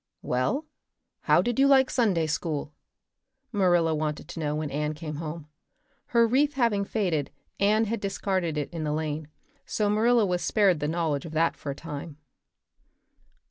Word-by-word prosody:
"Well, 130 - 0 0.6
how - - +5
did 240 +1 -1
you 275 - +6
like 265 -1 +5
Sunday 195 -10 +2
school?" 150 -1 -3 0.8
Marilla 175 -6 +3
wanted 150 -1 -3
to - - -7
know 150 -1 -1
when 155 -1 -3
Anne 150 +2 -2
came 150 -1 -6
home. 155 -1 -6 0.6
Her 235 -1 +4
wreath 280 +6 +2
having 230 -6 +2
faded, 180 -10 -1 0.3
Anne 215 +3 +3
had 225 +1 -2
discarded 190 -4 -1
it 150 +3 -3
in 165 -2 -3
the 150 -1 -1
lane, 155 -1 -3 0.4
so 210 -1 0
Marilla 225 +1 +4
was 180 -2 -1
spared 195 -7 +3
the 150 - -1
knowledge 160 -2 -1
of 160 - -9
that 165 +1 +2
for 145 - -7
a 140 - -3
time. 150 -1 -7
165 Hz, 165 wpm, -27 LUFS, 150-210 Hz, 0.8 s, you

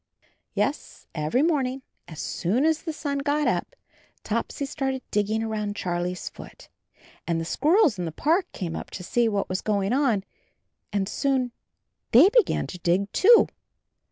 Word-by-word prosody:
Yes, - - -2
every 155 - +1
morning 270 -5 0 0.2
as 160 -2 -10
soon 225 - 0
as 320 -1 +2
the 325 - -4
sun 285 -2 -3
got 290 +1 +1
up, - - -1 0.5
Topsy 230 +5 -2
started 270 -2 -3
digging 210 +2 0
around 210 -2 -3
Charlie's 175 -1 -3
foot, - - -11 0.6
and 170 -1 0
the 165 - -3
squirrels 295 - +3
in 175 - -2
the 165 - -3
park 325 - +1
came 170 -3 -4
up - - -6
to 180 - -7
see 235 +5 +1
what 205 -2 -1
was 185 0 -2
going 205 0 0
on 245 -8 +2 0.7
and 200 -2 0
soon 260 +1 0 0.6
they 280 - +8
be 485 +3 +6
gan 385 - -2
to 180 - -8
dig 185 +4 +1
too. 460 +4 +6
230 Hz, 160 wpm, -25 LUFS, 190-290 Hz, 0.7 s, they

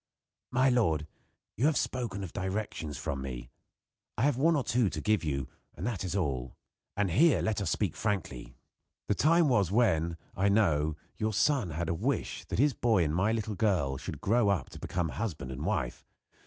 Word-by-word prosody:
"My 130 +1 +3
lord, 80 -12 +2 0.5
you 130 +7 +2
have 155 -4 +2
spoken 115 -6 -2
of 90 - -7
directions 95 -6 -3
from 70 -1 -3
me. 65 -1 -6 0.7
I 110 - 0
have 145 -1 +3
one 160 +6 +3
or 140 - +1
two 120 -4 +2
to - - -5
give 110 -3 +1
you, 70 -4 -2 0.3
and 85 - -5
that 110 -6 -2
is 95 0 -3
all. 65 -9 -2 0.4
And 100 -3 +1
here 145 - +5
let 105 +2 0
us 100 - -1
speak 100 -6 0
frankly. 70 - -3 0.5
The - - +3
time 165 +8 +4
was 100 - +2
when, 85 -8 +2 0.2
I 100 +2 +2
know, 80 -8 +2 0.2
your 110 0 -1
son 125 - +2
had 80 +2 -3
a 85 - 0
wish 80 - -2
that - - -4
his 140 +4 +4
boy 110 -8 +2
and 75 -1 -1
my 95 +6 +2
little 110 -1 -2
girl 90 -11 +1
should - - -7
grow 110 0 +3
up 100 -3 0
to - - -10
become 90 -3 -2
husband 80 - -4
and 65 - -5
wife. - - -2
100 Hz, 195 wpm, -30 LUFS, 80-115 Hz, 0.7 s, here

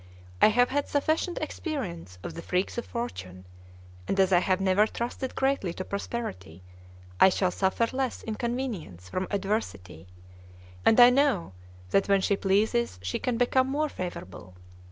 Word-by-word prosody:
I - - +9
have 245 +3 +3
had 285 +1 -1
sufficient 315 +4 0
experience 190 - -5
of - - -5
the 170 - -7
freaks 185 +7 -1
of - - -7
fortune; 95 - -6 0.6
and 195 - -1
as 190 0 +4
I 175 - +6
have 185 +1 +1
never 195 +2 +3
trusted 240 +3 -4
greatly 265 -10 0
to 185 - -5
prosperity, 95 - -5 0.6
I - - +8
shall 185 -1 +1
suffer 190 +5 +1
less 265 -2 -2
inconvenience 220 - -4
from 185 - -2
adversity; 100 - -3 0.8
and 225 - +5
I 245 0 +9
know 255 - +1 0.4
that 195 - +2
when 195 -1 +4
she 200 - +2
pleases 210 - +1
she 95 - -2
can 245 -2 -1
become 260 +2 +2
more 300 +2 0
favorable. 95 - -7
200 Hz, 155 wpm, -27 LUFS, 175-245 Hz, 0.8 s, I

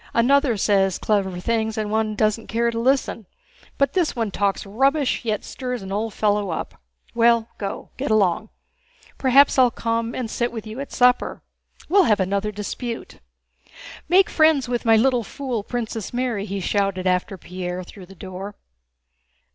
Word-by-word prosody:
Another 255 0 +3
says 195 -2 +2
clever 195 -4 0
things 220 +2 -1
and 210 -1 -2
one 220 -1 0
doesn't 215 +1 0
care 235 +1 0
to 230 - -3
listen, 245 -4 0 0.5
but 275 -1 +2
this 355 -4 +1
one 225 -4 -1
talks 200 +1 -1
rubbish 270 +8 +1
yet 215 -3 -2
stirs 250 -4 -5
an 190 - -7
old 215 +3 -2
fellow 205 -2 +1
up. 165 - -5 0.3
Well, 235 -1 +3
go! 195 -2 -5
Get - - -3
along! 215 0 +2 0.7
Perhaps 270 +1 +5
I'll 250 -1 +6
come 230 0 -2
and 250 - -3
sit 240 +2 -2
with 225 -2 -7
you 220 +4 -7
at 280 - -6
supper. 250 0 +2 0.4
We'll 385 +1 +5
have 210 -6 +3
another 200 +3 0
dispute. 230 +3 -6 0.9
Make 370 +2 +5
friends 310 -5 +4
with 240 -1 -2
my 225 -1 +6
little 245 +1 +3
fool, 250 -1 -4
Princess 225 -1 -4
Mary," 240 -5 -2
he 200 -1 -4
shouted 195 -1 0
after 185 +2 0
Pierre, 180 0 -5
through 180 0 -13
the 195 - -14
door. 190 +2 -8
220 Hz, 165 wpm, -22 LUFS, 200-245 Hz, 0.9 s, I'll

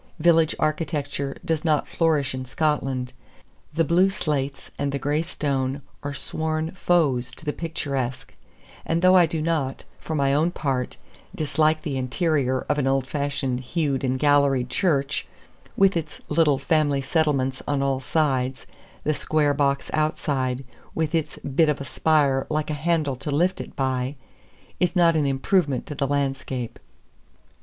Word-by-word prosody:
Village 165 -1 +4
architecture 145 -3 -2
does 160 -3 0
not 155 -3 +2
flourish 150 -5 +1
in 130 0 -4
Scotland. 130 -2 -1 0.6
The 165 - +3
blue 175 +4 +4
slates 145 -8 -3
and 140 -1 0
the 140 - -1
gray 145 +3 0
stone 140 -4 -2 0.2
are 145 0 -4
sworn 155 +3 -2
foes 150 -9 +1
to 155 - -14
the 150 - -1
picturesque; 135 -6 -3 0.5
and 165 +2 -1
though 185 0 +7
I 175 -2 +6
do 160 -1 -2
not, 155 -5 -1 0.2
for 160 - -4
my 140 -2 +2
own 155 +4 +3
part, 135 -7 -2 0.4
dislike 155 +1 +1
the 145 -6 -2
interior 130 -1 0
of 150 0 +1
an 135 - +1
old 135 -1 +2
fashioned 140 -2 -2
hewed 140 0 -1
and 130 0 +1
galleried 140 -3 +3
church, 145 -7 0 0.5
with 195 -1 +5
its 160 -2 -3
little 150 -2 +3
family 145 0 +1
settlements 135 -3 0
on 140 -1 +1
all 135 -1 +1
sides, 130 -3 0 0.4
the 155 - +1
square 150 -1 +1
box 140 -1 0
outside, 140 -4 0 0.3
with 160 -1 -1
its 160 -2 -1
bit 150 +3 +2
of 150 - 0
a 140 - -5
spire 140 -1 +2
like 155 0 -1
a - - -1
handle 155 -2 0
to 140 - -6
lift 175 +6 +1
it - - -10
by, 130 0 -1 0.6
is 180 0 +1
not 170 -2 +5
an 150 -3 +2
improvement 140 +1 +1
to - - -6
the 140 -1 -1
landscape. 135 -4 -2
145 Hz, 155 wpm, -24 LUFS, 135-160 Hz, 0.6 s, though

